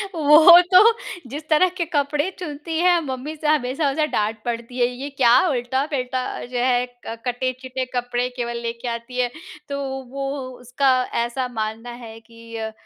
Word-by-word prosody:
वो 315 +3 +8
तो 365 - +10 0.5
जिस 295 +4 -7
तरह 315 +4 +4
के 340 - 0
कपड़े 295 +1 0
चुनती 320 -1 -5
है 355 0 +4
मम्मी 270 +3 -5
से 305 0 -4
हमेशा 285 0 +1
उसे 305 +2 +1
डाँट 215 -5 -1
पड़ती 235 +1 -4
है 240 - +4
ये 255 +3 -6
क्या 260 -4 +3 0.2
उल्टा-पलटा 260 -1 -1 0.2
जो 245 0 -6
है, 245 0 +2
अ, 245 -2 -9
कटे-चिटे 255 +1 -3
कपड़े 245 0 -1
केवल 235 -1 -3
लेके 235 +1 -5
आती 235 +2 -5
है। 245 -1 +1 0.4
तो 280 - -3 0.3
वो, 275 0 -4 0.4
उसका 250 +3 0 0.3
ऐसा 250 +2 -3
मानना 225 0 -4 0.2
है 225 0 -10
कि 230 0 -14
अ 220 0 -4
255 Hz, 165 wpm, -22 LUFS, 240-290 Hz, 0.5 s, तो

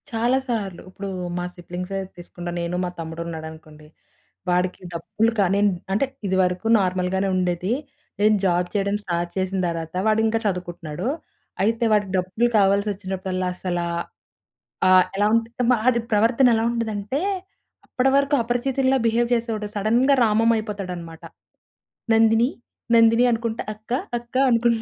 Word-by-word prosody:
చాలా 240 +1 +1
సార్లు. 205 -7 -3
ఇప్పుడు 195 +1 -7 0.3
మా 175 - -2
సిబ్లింగ్సే 180 +2 -5 0.2
తీసుకుంటా 175 0 -7
నేను 170 +1 -2
మా 180 - -1
తమ్ముడున్నాడనుకోండి. 160 -2 -7 0.6
వాడికి 180 +1 0
డబ్బులు 215 +7 0
కాని 195 0 +3 0.3
అంటే 215 +8 +2 0.2
ఇది 190 - 0
వరకు 180 +4 -1
నార్మల్‌గానే 185 +1 0
ఉండేది. 180 +2 0 0.5
నేను 215 +1 +5
జాబ్ 180 -1 +2
చేయడం 200 -1 0
స్టార్ట్ 175 -2 -2
చేసిన 190 0 -1
దర్వాత 165 0 -4
వాడింకా 220 +1 +2
చదువుకుంటున్నాడు. 175 -3 -3 0.6
అయితే 225 +3 +1
వాడికి 205 -3 +2
డబ్బులు 185 +6 +1
కావాల్సొచ్చినప్పుడల్లా 190 -2 0
అసల 180 -1 -3 1.1
ఆ - - +5 0.3
ఎలా 205 +1 +2
ఉంటు 230 +2 -1 0.2
ఆడి 250 -2 +4
ప్రవర్తనెలా 230 +2 +4
ఉంటదంటే 220 +1 -2 0.7
అప్పడివరకు 275 +2 +2
అపరిచితుడిలా 260 +3 +1
బిహేవ్ 235 +1 +1
జేసేవోడు 225 -3 -1
సడెన్‌గా 235 +7 +3
రామంమయిపోతాడనమాట. 210 -7 -1 0.9
"నందిని, 225 +2 +4 0.5
నందిని" 230 +1 +5
అనుకుంట 230 0 -3 0.2
"అక్క, 215 +2 -18 0.3
అక్క" 240 +1 -21
అనుకుంట 235 -1 +2
205 Hz, 115 wpm, -23 LUFS, 180-230 Hz, 1.1 s, నేను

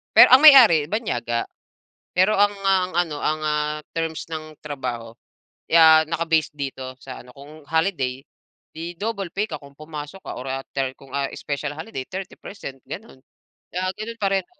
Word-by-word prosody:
Pero - - +9
ang 265 +4 +7
may-ari 235 - +9
banyaga, 120 - -2 0.7
pero 190 +4 +4
ang, 205 +1 +4 0.2
ah, 190 -1 +3
ano 165 -4 -1
ang, 155 0 0
ah, 150 0 -1 0.2
terms 165 -1 -3
ng 155 -1 -7
trabaho 125 -6 -6 0.5
ya 160 -1 +6
naka-base 165 0 0
dito 135 -2 -6
sa 130 -2 -9
ano 125 - -14
kung 145 +2 -14
holiday 155 -5 0 0.6
di 165 +2 -6
double 200 -4 -3
pay 205 +2 -1
ka 155 - -4
kung 140 -1 -16
pumasok 155 +4 -9
ka - - -7
or 125 - -7
ah, 135 0 -3 0.2
thir 135 -1 0
kung, 135 +1 -18
ah, 140 +1 -1
special 145 0 -4
holiday 155 -3 -7
30% 185 -4 -8
gano'n, 220 -8 -9 0.6
ah, 185 - 0
gano'n 230 +2 -7
pa 200 - +2
rin. 190 -2 0
155 Hz, 165 wpm, -23 LUFS, 140-185 Hz, 0.7 s, Pero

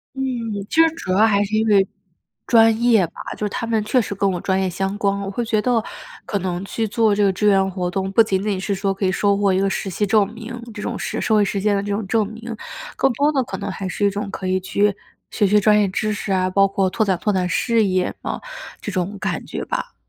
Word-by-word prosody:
嗯， 265 - -4 0.5
其 - - -4
实 325 0 +6
主 190 - -5
要 200 +4 +5
还 205 -2 +3
是 205 +1 -2
因 220 +1 +2
为 200 -2 +4 0.6
专 225 -1 +5
业 230 -6 +4
吧。 - - -25 0.2
就 - - -18
是 - - -1
他 230 - -3
们 225 -2 0
确 215 +4 +2
实 205 - -4
跟 200 0 +1
我 180 - -3
专 190 0 0
业 190 - 0
相 195 +2 -2
关， 200 -1 +1
我 195 - -4
会 240 +5 -2
觉 225 -2 0
得， 235 -1 +1 0.4
可 205 - -1
能 180 -1 -3
去 225 +2 -2
做 215 0 +2
这 205 - +2
个 195 -1 +3
志 210 +3 0
愿 195 -1 +3
活 180 -1 -2
动， 190 +1 -2
不 210 - +5
仅 195 -4 +1
仅 205 -3 -1
是 200 +1 -1
说， 195 0 -1
可 195 +1 -2
以 - - +1
收 200 +2 +2
获 200 -1 +2
一 185 - +2
个 195 - +2
实 195 - -3
习 200 +3 -1
证 210 -1 +2
明， 225 +1 -8 0.2
这 210 - -7
种 - - -3
社 - - -3
社 - - 0
会 210 - +4
实 200 0 -1
践 205 +1 +2
的 200 - 0
这 205 +1 -4
种 205 +1 -2
证 215 +1 +1
明， 225 +2 -7 0.4
更 270 - +2
多 285 +5 +2
的， 270 -3 +1
可 195 - -6
能 200 0 -4
还 190 0 -5
是 205 - -1
一 - - +4
种 205 +1 -4
可 195 - -6
以 185 0 +1
去， 200 +2 +1 0.4
学 205 - +2
学 210 +2 +4
专 210 +1 +4
业 205 - +3
知 215 +3 -1
识 205 -1 -4
啊， 185 -1 +2
包 195 +1 +4
括 195 -1 0
拓 220 - 0
展 190 -3 +1
拓 210 - 0
展 180 -1 0
事 230 +5 +2
业， 185 -2 0
嗯， - - -3 0.4
这 205 - -4
种 185 +2 -2
感 - - -2
觉 - - -5
吧。 - - -4
200 Hz, 295 characters per minute, -21 LUFS, 190-220 Hz, 0.6 s, 实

